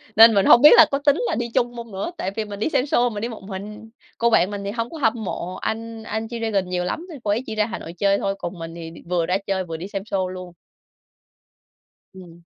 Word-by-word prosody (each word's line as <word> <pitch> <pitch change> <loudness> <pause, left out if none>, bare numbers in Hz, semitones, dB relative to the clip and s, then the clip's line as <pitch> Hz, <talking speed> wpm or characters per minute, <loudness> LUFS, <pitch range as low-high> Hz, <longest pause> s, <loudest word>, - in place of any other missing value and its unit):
Nên 225 0 +9
mình 195 -1 +3
hông 240 - +7
biết 300 - +9
là - - +10
có 275 - +1
tính 285 0 +5
là - - -1
đi 235 0 -2
chung 245 -2 +1
hông 235 -2 -8
nữa? 195 - -4
Tại 190 - -3
vì 220 -1 -2
mình 205 -1 -8
đi 220 - 0
xem 255 - +1
sô 245 -4 +2
mình 210 -2 -6
đi 235 - -2
một 220 -4 -9
mình. 210 +3 -8 0.3
Cô 235 0 +2
bạn 195 -2 +3
mình 200 -1 -5
thì 200 - -3
hông 230 +1 -3
có 330 - -8
hâm 230 -5 0
mộ 180 -1 -4
anh 225 0 -5
anh 220 +1 -3
G-Dragon 225 -4 -2
nhiều 180 -1 -2
lắm 320 - -4
nên 300 -5 -9
cô 205 - 0
ấy 230 +5 0
đi 220 - -4
ra 210 -1 +2
Hà 225 - -6
Nội 165 - -9
chơi 200 +2 +2
thôi, 195 0 -2
còn 175 0 -6
mình 165 0 -7
thì 165 -1 -7
đi 165 - -13
vừa 175 -2 +1
ra 180 +3 +1
chơi, 190 -1 0
vừa 165 -2 -6
đi 180 +4 -7
xem 195 0 -5
sô 190 -3 -1
luôn. 185 -1 -8 1.6
Ừm. 175 -2 -13
205 Hz, 270 wpm, -22 LUFS, 185-230 Hz, 1.6 s, là